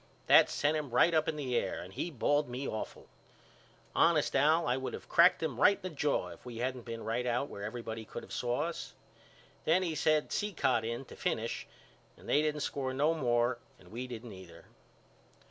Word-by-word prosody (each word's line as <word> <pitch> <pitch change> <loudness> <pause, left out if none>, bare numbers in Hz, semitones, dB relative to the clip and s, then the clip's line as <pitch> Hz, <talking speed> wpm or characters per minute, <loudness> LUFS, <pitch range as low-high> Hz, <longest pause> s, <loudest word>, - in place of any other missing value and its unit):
That - - +7
sent 145 +2 +1
him 150 -3 -2
right 145 +8 +4
up 155 -1 +2
in 160 - -1
the 135 -5 -2
air 95 - 0
and 95 +2 -9
he 175 - -3
bawled 145 0 +1
me 125 +3 -4
awful. 110 - -5 0.9
Honest 165 -4 +3
Al 155 +5 +4
I 125 - +2
would 130 0 -4
of - - -11
cracked 170 0 +5
him 135 -7 -2
right 200 - +7
in - - -25
the 185 - -4
jaw 145 +1 0
if - - -12
we 120 -2 -8
hadn't 125 0 -3
been 115 -1 -6
right 120 +2 -1
out 125 +4 0
where 100 - -8
everybody 110 0 -5
could 115 - -8
of - - -10
saw 120 +3 -1
us. 170 0 -5 0.7
Well 175 +4 +3
he 170 -3 -1
sent 155 0 +1
Cicotte 145 - 0
in 115 +3 -4
to - - -12
finish - - -2 0.5
and - - -15
they 150 - +3
didn't 150 -1 -1
score 130 -2 -2
no 150 +4 +3
more 120 -4 +1 0.2
and 90 0 -18
we 125 +3 -5
didn't 120 -2 -8
either. 90 -3 -13
130 Hz, 205 wpm, -32 LUFS, 120-155 Hz, 0.9 s, That